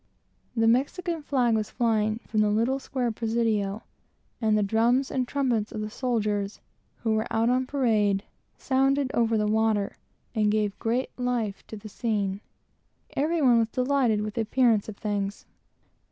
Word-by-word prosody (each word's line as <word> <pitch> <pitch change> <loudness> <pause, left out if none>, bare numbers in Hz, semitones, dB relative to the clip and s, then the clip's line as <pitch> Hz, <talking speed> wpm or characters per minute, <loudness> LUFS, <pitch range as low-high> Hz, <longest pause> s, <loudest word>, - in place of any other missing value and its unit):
The 225 -1 +3
Mexican 320 +8 +1
flag 255 -5 +1
was 215 -1 0
flying 220 -1 0
from 215 - 0
the 210 - +3
little 230 +6 +1
square 255 -3 -2
Presidio, 220 -2 -1 0.6
and 215 -1 +3
the 210 - +2
drums 235 +6 +2
and 255 -2 -1
trumpets 245 -7 0
of 215 - -4
the 215 0 -4
soldiers, 210 -5 -1 0.4
who 225 - +1
were 220 +1 0
out 225 +2 +2
on 255 +1 +1
parade, 215 -8 +1 0.3
sounded 270 0 +1
over 230 -1 +2
the 210 - +1
water, 215 -1 +1 0.4
and 215 -2 +2
gave 210 -2 0
great 240 +3 -1
life 240 -5 -1
to 220 - -8
the 210 - -10
scene. 205 -3 -2 0.7
Every 315 +2 +1
one 245 -3 +6
was 225 -1 +1
delighted 250 -4 +1
with 210 0 -4
the 230 - -1
appearance 225 -2 +2
of 205 - -8
things. 205 -1 -3
225 Hz, 160 wpm, -26 LUFS, 210-250 Hz, 0.7 s, one